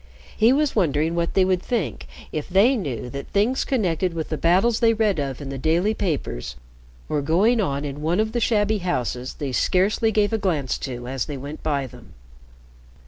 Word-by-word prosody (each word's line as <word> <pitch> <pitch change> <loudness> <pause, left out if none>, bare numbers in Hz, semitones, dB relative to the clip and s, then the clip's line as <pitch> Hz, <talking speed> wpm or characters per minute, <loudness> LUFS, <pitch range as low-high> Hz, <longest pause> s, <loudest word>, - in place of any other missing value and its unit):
He 225 +2 +4
was 290 +1 +1
wondering 160 -4 +1
what 170 0 -1
they 190 - +5
would 185 -1 +1
think 160 - -3 0.2
if 155 -2 -4
they 205 +9 +4
knew 140 - -4
that 140 0 -6
things 220 +6 +1
connected 185 - 0
with 160 -1 -3
the 155 - -1
battles 190 +9 +3
they 230 -1 +4
read 210 -6 +1
of 135 -3 -3
in 140 - -6
the 135 -1 -5
daily 170 - +2
papers 135 - -3 0.5
were 150 - 0
going 200 - +3
on 140 -6 -1
in 145 +1 -5
one 165 +5 +1
of 220 0 +1
the 240 - -1
shabby 215 -2 +2
houses 130 - -2
they 140 -3 -4
scarcely 195 - +2
gave 210 0 +1
a 220 - +1
glance 155 -10 -1
to 120 -2 -6
as 130 -1 -2
they 145 - -5
went 145 +4 -8
by 145 -3 -1
them. 125 - -14
170 Hz, 195 wpm, -23 LUFS, 140-215 Hz, 0.5 s, they